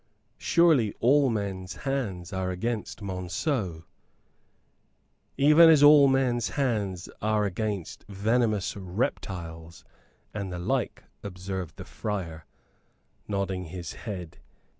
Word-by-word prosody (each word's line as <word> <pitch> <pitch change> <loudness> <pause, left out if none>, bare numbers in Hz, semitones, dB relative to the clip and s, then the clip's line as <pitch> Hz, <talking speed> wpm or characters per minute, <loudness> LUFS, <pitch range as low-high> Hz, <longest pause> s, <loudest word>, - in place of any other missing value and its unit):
"Surely 155 -11 +3
all 140 +3 +4
men's 95 -4 -3
hands 105 - -3
are 95 -1 -1
against 105 +3 -3
Monceux!" 90 - -2 1.5
"Even 150 +4 +7
as 155 -3 +6
all 145 -1 +8
men's 125 -5 +1
hands 100 -7 -1
are 105 0 +1
against 100 -2 -4
venomous 105 0 0
reptiles 90 - -4 0.5
and 100 -3 -4
the 90 - -4
like," 85 - -2 0.2
observed 95 -3 -6
the - - -8
friar, 85 -7 -5 0.8
nodding 95 -2 -2
his 85 0 -7
head. 90 -8 -7
100 Hz, 100 wpm, -27 LUFS, 90-120 Hz, 1.5 s, all